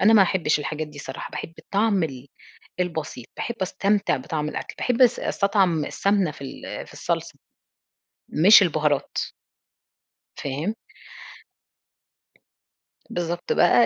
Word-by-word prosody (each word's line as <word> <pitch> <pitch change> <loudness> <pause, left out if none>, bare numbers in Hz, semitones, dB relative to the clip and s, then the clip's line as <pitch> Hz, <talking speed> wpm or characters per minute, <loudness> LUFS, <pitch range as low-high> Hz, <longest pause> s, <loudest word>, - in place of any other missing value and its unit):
أنا 220 +3 +6
ما 210 - +8
احبش 175 -5 +2
الحاجات 155 +1 -3
دي 150 -1 -12
صراحة، 135 -1 -7
باحب 165 - -6
الطعم 200 -1 +1
ال 135 -4 -4 0.5
البسيط، 160 -8 -3
باحب 235 - -3
أستمتع 200 0 +1
بطعم 150 +3 -3
الأكْل، - - -5
باحب 250 0 +2
أس 245 - +5
أستطعم 195 -6 +2
السمنة 200 -4 +1
في 145 - -12
ال 135 - -7
في - - -15
الصلصة - - -2 1.0
مش 195 +8 +8
البهارات. 155 -5 +1 1.2
فاهم؟ 145 +10 -2 2.3
بالضبط 175 -4 -2
بقى 235 - +5
175 Hz, 115 wpm, -24 LUFS, 150-200 Hz, 2.3 s, ما